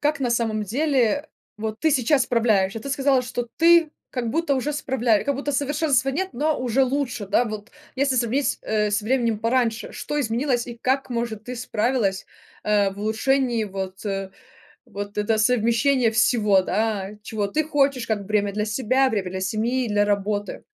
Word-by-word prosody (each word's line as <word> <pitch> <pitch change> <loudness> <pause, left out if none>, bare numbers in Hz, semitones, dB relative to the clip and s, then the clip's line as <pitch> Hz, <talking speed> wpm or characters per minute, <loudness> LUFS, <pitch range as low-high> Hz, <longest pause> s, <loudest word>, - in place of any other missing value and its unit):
Как 295 0 0
на 250 -3 0
самом 225 -2 0
деле 275 +4 +1 0.3
вот 220 0 -4
ты 320 - +3
сейчас 270 0 +3
справляешься? 220 -4 +1
Ты 275 - -7
сказала, 270 -1 +2
что 245 -1 -4
ты 335 -1 +5 0.2
как 240 -3 -3
будто 325 +1 +1
уже 275 +3 -1
справля 245 -7 +1
как 280 - 0
будто 285 +2 -3
совершенства 285 -1 +1
нет, 375 +8 -2
но 300 +4 0
уже 255 +1 +2
лучше, 255 -5 -2
да, 205 +5 +2
вот 215 0 -7 0.3
если 270 -1 +1
сравнить, 250 +4 0
э, 210 -1 0
со 205 +1 0
временем 235 -2 +1
пораньше, 230 0 0
что 295 0 -3
изменилось 245 0 0
и 240 -1 -8
как, 265 +1 0
может, 235 -3 -3
ты 250 +2 -6
справилась, 220 -3 -1 0.4
а, 205 -2 +2
в 195 - -11
улучшении 235 +2 +1
вот, 190 -1 -6
э, 195 -2 -3 0.6
вот 205 0 -7
это 220 +1 +1
совмещение 235 +3 +3
всего. 220 -3 +3
Да, 205 -1 -1
чего 210 -1 -2
ты 310 +10 0
хочешь, 275 -5 +1
как 215 -2 -1
время 205 0 0
для 210 +1 -1
себя, 255 +4 +1
время 200 -5 -2
для 190 0 -4
семьи, 230 +6 -1
для 205 -1 +2
работы. 205 0 -2
235 Hz, 175 wpm, -23 LUFS, 210-270 Hz, 0.6 s, ты